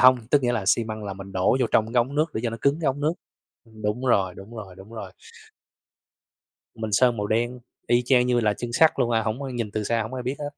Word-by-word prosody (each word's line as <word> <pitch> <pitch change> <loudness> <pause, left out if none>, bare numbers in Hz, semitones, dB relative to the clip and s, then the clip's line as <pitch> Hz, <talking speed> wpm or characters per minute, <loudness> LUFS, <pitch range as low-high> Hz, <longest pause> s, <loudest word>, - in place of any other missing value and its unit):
hông, 130 0 +8
tức 145 -2 +4
nghĩa 120 0 +2
là 105 -5 -1
xi 115 +2 +3
măng 110 -1 -6
là 100 - -4
mình 95 0 -9
đổ 95 +7 +2
vô - - +3
trong 110 - +4
cái 120 - +4
ống 130 +4 -2
nước 155 +2 +2
để 110 - -1
cho 115 - 0
nó 115 - -5
cứng 140 +4 +2
cái 155 - -1
ống 135 +1 0
nước 155 +3 +2 0.5
ưm, 110 -1 -15
đúng 105 +5 -1
rồi, 95 -6 +2
đúng 105 +5 -11
rồi, 95 -4 -8
đúng 100 +4 -13
rồi. 100 -5 -7 1.6
Mình 110 -1 -4
sơn 120 +2 +4
màu 105 - -2
đen, 120 +3 0 0.3
y 120 0 +4
chang 125 -1 +4
như 125 -1 +3
là 105 -3 +2
chân 120 +2 -6
sắt 160 +4 +6
luôn 120 -2 +2
à, 115 -1 +2
hổng 110 +3 -2
có 140 - -4
nhìn 115 -4 -3
từ 110 - -2
xa 115 +2 0
hổng 110 +4 -6
ai 125 -1 -4
biết 130 +3 -2
hết. 145 -1 -3
115 Hz, 280 wpm, -25 LUFS, 105-125 Hz, 1.6 s, hông